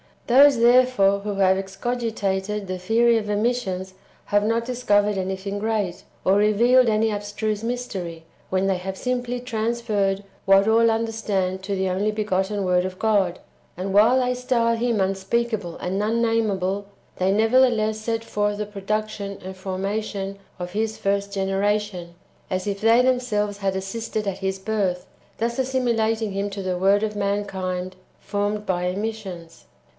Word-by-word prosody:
Those, 270 +1 +6
therefore, 240 -5 +5
who 205 0 -4
have 190 -1 +3
excogitated 200 -1 -2
[the 185 -1 -4
theory 230 +5 +3
of] 210 -2 -3
emissions 205 -4 -1 0.3
have 205 0 +2
not 230 +1 +1
discovered 210 -5 +1
anything 190 +2 -3
great, 205 -5 -2 0.2
or 195 +1 +4
revealed 235 +5 +4
any 220 0 +2
abstruse 210 +1 -3
mystery, 195 -9 -4 0.3
when 190 +1 +1
they 195 -1 +1
have 190 +1 -5
simply 245 0 -2
trans 235 -1 -2
ferred 200 -3 0 0.2
what 195 +1 +5
all 230 +1 +5
understand 220 -5 -1
to 200 +1 -2
the 190 0 0
only 195 +4 0
begotten 205 -1 -1
Word 180 0 +2
of 185 0 -5
God; 200 -5 +1 0.4
and 190 +1 -3
while 230 +6 +5
they 250 0 +1
style 245 -2 +1
Him 230 -2 0
unspeakable 195 0 -1
and 190 +3 -2
unname 225 0 +1
able, 190 +1 -2 0.3
they 185 +1 +2
nevertheless 220 0 +3
set 225 +1 -2
forth 205 -2 -1
the 210 - -2
production 205 0 -3
and 190 +1 -7
forma 190 +3 -2
tion 195 -2 -5 0.2
of 180 0 -5
His 220 +2 -2
first 200 0 -1
generation, 195 -2 -1 0.3
as 185 -1 -2
if 200 -1 -2
they 225 +2 +5
themselves 240 -5 0
had 195 -1 -1
assisted 215 +3 -3
at 195 -1 -2
His 190 0 -2
birth, 190 -3 -1 0.3
thus 235 +2 -1
assimilating 230 -4 0
Him 200 +1 -2
to 195 0 -5
the 185 -1 -1
word 195 +3 +3
of 215 -1 -2
mankind 190 -2 -2 0.2
formed 205 +1 -2
by 180 -2 -1
emissions. 190 -3 -5
205 Hz, 155 wpm, -23 LUFS, 190-225 Hz, 0.4 s, Those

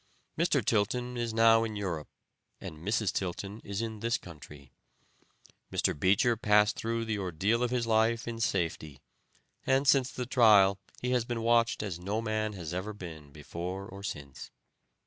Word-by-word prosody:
Mr. - - +1
Tilton 120 +4 0
is 120 -1 -2
now 115 0 +5
in 110 -2 -4
Europe, 90 -7 -3 0.5
and 80 - -8
Mrs. 105 +3 0
Tilton 100 +3 -4
is 100 +2 -3
in 110 -2 -5
this 115 +2 0
country. 75 -5 -13 1.0
Mr. - - +1
Beecher 100 - +3
passed 105 -1 +3
through 115 0 -2
the 110 -2 -2
ordeal 100 +6 0
of 125 - +1
his 125 -1 0
life 115 +1 +2
in 115 -1 -4
safety, 85 - -2 0.6
and 135 +1 +2
since 135 -2 +4
the 125 - -4
trial 105 -6 +5 0.2
he 125 - 0
has 125 -2 +2
been 115 -1 -4
watched 115 -1 +2
as 95 -5 -4
no 100 +5 -2
man 110 -1 -2
ever 90 +3 -4
has - - -16
been 80 -6 -9
before 85 +6 -6
or 100 +1 -10
since. 70 -8 -7
105 Hz, 165 wpm, -30 LUFS, 90-115 Hz, 1.0 s, now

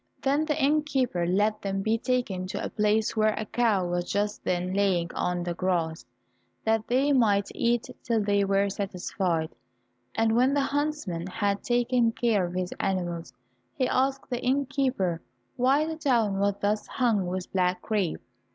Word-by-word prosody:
Then 285 +3 +1
the 305 -1 -1
innkeeper 270 - +1
let 210 +4 +1
them 195 -1 -2
be 220 +2 +1
taken 240 -8 -1
to - - -4
a - - -3
place 215 +1 +1
where 215 -1 +2
a 215 - -2
cow 215 -5 +1
was 175 0 -2
just 205 +1 -1
then 180 +1 -1
lying 190 -4 +1
on 180 0 -1
the 175 0 -2
grass, 170 -3 -1 0.6
that 220 0 +1
they 270 +4 +2
might 205 -6 +3
eat 235 0 +1 0.2
till 230 -2 0
they 205 -1 +2
were 195 0 +2
satisfied. 185 -4 -2 0.6
And 225 0 +2
when 255 +4 +3
the 285 - +3
huntsman 280 - -2
had 200 0 -1
taken 240 -1 +2
care 215 -7 +1
of 175 - -8
his 185 0 -2
animals, 175 -5 -2 0.4
he 255 - +1
asked 270 +2 0
the 245 - -2
innkeeper 260 - 0 0.3
why 270 +5 +3
the 320 0 -4
town 235 -10 +1
was 200 0 +2
thus 210 +1 0
hung 225 -8 +1
with 185 0 -4
black 180 -1 +1
crape? 205 -7 -1
210 Hz, 165 wpm, -27 LUFS, 185-250 Hz, 0.6 s, might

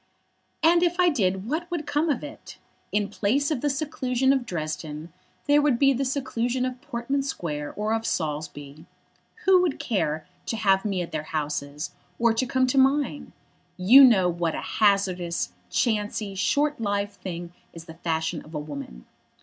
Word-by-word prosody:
"And 340 +2 +5
if 350 0 +1
I 360 -1 +5
did 190 - 0
what 325 +6 -2
would 340 -4 -3
come 295 +3 0
of 280 - 0
it? 295 +1 -10 0.3
In 205 -1 +1
place 260 +9 0
of 275 -6 -1
the 295 - +1
seclusion 270 -2 0
of 260 -3 -1
Dresden, 155 -1 -5 0.3
there 290 0 +5
would 285 -5 +2
be 275 +1 +4
the 265 +2 -1
seclusion 255 -2 -1
of 255 -1 -5
Portman 275 -1 -2
Square 150 - -4
or 210 +1 -1
of 225 0 -1
Saulsby. 150 -1 -4 0.6
Who 375 -1 +6
would 345 -6 0
care 155 -8 -1 0.2
to 225 - -2
have 195 -2 +2
me 190 -4 0
at 170 - -9
their 155 - -2
houses, 150 -1 -4 0.3
or 235 -1 +3
to 250 +3 0
come 260 +1 +2
to 255 +2 +2
mine? 280 +2 +1 0.5
You 230 +10 +8
know 210 -8 +6
what 170 -2 -1
a - - -3 0.2
hazardous, 185 - +2 0.2
chancy, 210 - -1
short 285 +11 +1
lived 205 -1 -1
thing 175 -3 -7 0.2
is 165 -1 -11
the 160 - -10
fashion 160 -1 -2
of 155 +1 -12
a - - -1
woman. 140 - -8
215 Hz, 175 wpm, -25 LUFS, 170-275 Hz, 0.6 s, You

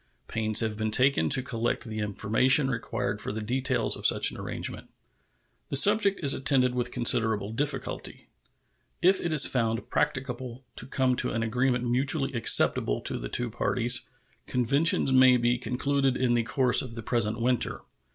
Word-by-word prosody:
Pains 110 -1 +2
have 110 -1 -3
been 110 0 -2
taken 130 +5 +2
to 135 -1 +3
collect 120 -1 -3
the 110 -2 -7
information 110 +7 +1
required 110 -3 -4
for - - -5
the 110 - -5
details 125 +5 -2
of - - +2
such - - +3
an - - -11
arrangement. - - -7 0.8
The - - -3
subject 200 +5 +4
is 140 - +6
attended 130 -2 +1
with 125 -1 -2
considerable 110 -3 0
difficulty. 140 +1 -4 0.8
If 190 +2 +4
it 170 - -3
is 155 -3 +6
found 115 -2 -2
practicable 130 -3 -4
to 125 - -9
come 130 -1 0
to - - -1
an 115 - -2
agreement 125 +2 -1
mutually 135 +3 0
acceptable 85 - +3
to - - -4
the - - -7
two 120 -1 -3
parties, 120 +1 +1 0.4
conventions 135 +4 +1
may 130 -1 +5
be 120 0 0
concluded 135 +1 -1
in 125 -1 0
the 120 - +1
course 125 +2 +1
of 120 -3 -8
the 115 - -8
present 115 -1 -1
winter. 125 0 -1
125 Hz, 165 wpm, -26 LUFS, 115-135 Hz, 0.8 s, is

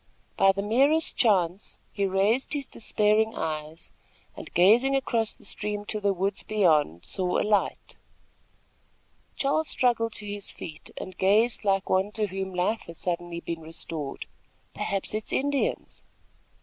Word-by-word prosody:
By 195 - +5
the 200 +1 -3
merest 275 +9 +3
chance, 190 -4 +1
he 200 -2 0
raised 205 +8 +1
his 285 -2 -2
despairing 220 -1 +1
eyes 155 0 -5 0.4
and, - - -9
gazing 230 +10 +5
across 230 -5 0
the - - -16
stream 205 0 -2
to 215 - -2
the 200 -1 +1
woods 195 +1 -1
beyond, 155 - +2
saw 180 - 0
a - - +1
light. 210 -2 0 1.4
Charles 290 +3 +1
struggled 230 -4 +1
to 210 - -7
his 205 -1 -3
feet 155 -1 -8
and 185 - -7
gazed 215 +6 +3
like 195 -1 +1
one 190 +2 +1
to 215 -1 0
whom 190 -1 -4
life 190 +5 0
has 170 - -10
suddenly 175 -1 -3
been 165 -1 -5
restored. 160 -2 -4 0.5
"Perhaps 195 0 -3
it 215 0 -2
is - - -5
Indians!" 280 0 -1
200 Hz, 150 wpm, -27 LUFS, 180-225 Hz, 1.4 s, By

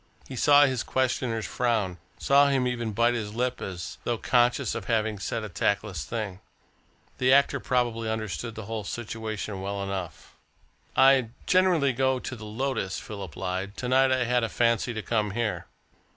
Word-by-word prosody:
He 130 - -7
saw 145 +3 +6
his 130 -3 0
questioner's 125 -3 -1
frown, 110 -8 -1 0.2
saw 140 +1 +5
him 135 -2 +2
even 120 -3 -2
bite 120 +3 +2
his 110 -3 -4
lip 125 +1 -1
as 90 -3 -6
though 120 - -1
conscious 120 +1 +2
of - - -5
having 110 -3 0
said 115 +3 -3
a - - -4
tactless 100 -5 -1
thing. 100 +2 -4 0.8
The 130 0 +3
actor 140 +1 +4
probably 120 -3 0
understood 110 -2 -4
the 110 -2 -7
whole 110 0 -4
situation 110 -2 -5
well 100 +1 -3
enough. 95 -4 -6 0.6
"I 135 -3 +5 0.2
generally 175 -7 +3
go 130 +1 +2
into 125 0 -6
the 110 -2 -9
Lotus," 110 -3 -2
Philip 100 -7 -8
lied. 95 +2 -4
"To 125 - -3
night 130 +1 +4
I 130 -1 +2
had 120 0 +1
a 115 - 0
fancy 115 0 +1
to 110 - -4
come 105 -3 0
here." 105 -7 -2
115 Hz, 170 wpm, -27 LUFS, 105-125 Hz, 0.8 s, saw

